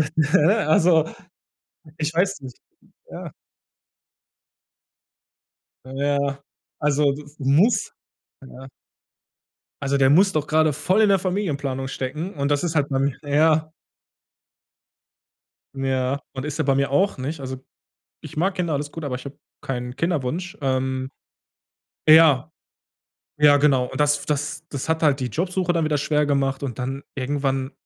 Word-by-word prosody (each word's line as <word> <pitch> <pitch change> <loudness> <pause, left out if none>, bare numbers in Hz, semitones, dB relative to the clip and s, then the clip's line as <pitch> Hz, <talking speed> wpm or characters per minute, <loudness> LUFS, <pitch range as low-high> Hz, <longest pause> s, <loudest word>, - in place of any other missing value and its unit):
ne, 160 +7 +3
also 160 0 +4 0.9
ich 155 +1 -2
weiß 185 0 0
nicht. 130 -2 -10 0.5
Ja. - - -8 2.5
Na 130 - -11
ja, 140 0 0 0.4
also, 145 -1 +2
das 145 +1 -11
muss 150 - +2 0.5
ja. 130 0 -11 1.1
Also, 140 0 0
der 135 -1 +4
muss 190 +8 +5
doch 155 -3 -1
grade 155 0 +3
voll 185 +9 +1
in 215 - +5
der 195 - +4
Familienplanung 145 -9 -2
stecken 150 +8 -4
und 140 -2 -2
das 145 +3 +1
ist 170 -1 -2
halt 145 -2 +1
bei 135 - -1
mir 135 0 0
ja. 155 +2 +2 2.0
Ja 135 0 -1
und 130 0 -5
ist 150 -1 -4
er - - +1
bei 135 0 +2
mir 140 0 0
auch 190 +5 +1
nicht. 145 +4 -4
Also, 130 -1 -5 0.6
ich - - -11
mag 185 +5 +1
Kinder 175 -4 -2
alles 145 +1 -3
gut, 165 - -7
aber 130 -3 -3
ich 125 - -10
habe 140 0 -9 0.2
keinen 125 -1 -5
Kinderwunsch. 165 +1 -2
Ähm, 130 -1 -1 1.0
ja. 155 -4 +6 0.9
Ja, 145 -1 +6
genau. 140 -3 +3
Und 130 +2 -7
das 150 0 +2
das 150 +1 -3
das 140 0 -5
hat 160 0 0
halt 145 -3 +3
die 130 - -2
Jobsuche 180 - -1
dann 165 -1 +1
wieder 150 -1 +1
schwer 150 +1 +1
gemacht. 135 -1 0
Und 130 -5 -4
dann 135 +2 -4
irgendwann 135 0 -2
145 Hz, 145 wpm, -23 LUFS, 135-160 Hz, 2.5 s, ja